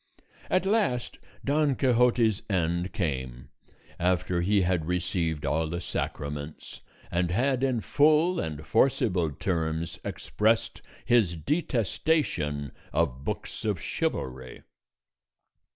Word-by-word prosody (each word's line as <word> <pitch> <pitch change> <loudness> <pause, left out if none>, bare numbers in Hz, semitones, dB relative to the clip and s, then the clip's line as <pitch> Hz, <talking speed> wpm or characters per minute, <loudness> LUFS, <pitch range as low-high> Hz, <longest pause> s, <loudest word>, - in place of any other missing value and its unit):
At 185 +1 +2
last 195 - 0 0.3
Don 145 -1 +2
Quixote's 120 -4 +3
end 85 -1 0
came, 65 - -3 0.5
after 90 0 +1
he 100 +3 +3
had 90 -3 0
received 85 -3 -1
all 80 +1 +1
the 85 +2 -3
sacraments, 75 -3 -5 0.3
and 85 0 +1
had 130 +7 +1
in 130 -4 +1
full 155 +7 +3
and 75 -1 -4
forcible 95 - +2
terms 80 +1 -2
expressed 110 +2 0 0.2
his 110 -8 +3
detestation 110 - 0 0.2
of 65 +2 0
books - - -5
of - - 0
chivalry. 65 -1 -3
90 Hz, 105 wpm, -28 LUFS, 80-125 Hz, 0.5 s, Quixote's